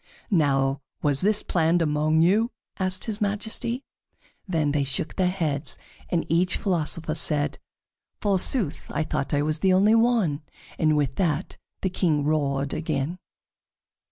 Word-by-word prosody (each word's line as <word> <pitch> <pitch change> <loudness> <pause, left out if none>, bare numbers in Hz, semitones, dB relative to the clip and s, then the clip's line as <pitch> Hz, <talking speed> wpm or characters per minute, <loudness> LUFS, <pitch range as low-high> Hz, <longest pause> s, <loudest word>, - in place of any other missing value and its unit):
"Now, 135 -5 +2 0.2
was 145 -3 +2
this 210 +2 +2
planned 165 0 +2
among 155 0 +2
you?" 210 +7 +3 0.3
asked 185 -1 0
his 220 -1 -3
Majesty. 220 +5 -1 0.6
Then 160 -5 +1
they 145 -1 +1
shook 140 +3 -1
their 185 -1 +2
heads, 155 -6 -2 0.3
and 170 -2 0
each 180 +3 +2
philosopher 165 -4 0
said: 150 -2 -1 0.6
"Forsooth, 200 - 0
I 155 - -1
thought 140 -3 -3
I 145 0 +2
was 155 +1 0
the 190 +1 +3
only 200 +4 +5
one," 225 -10 +2 0.4
and 155 -1 +3
with 145 -2 -1
that 170 -3 -1 0.2
the 190 - 0
King 155 -6 +1
roared 140 -2 0
again. 155 +1 -2
165 Hz, 140 wpm, -25 LUFS, 150-190 Hz, 0.6 s, only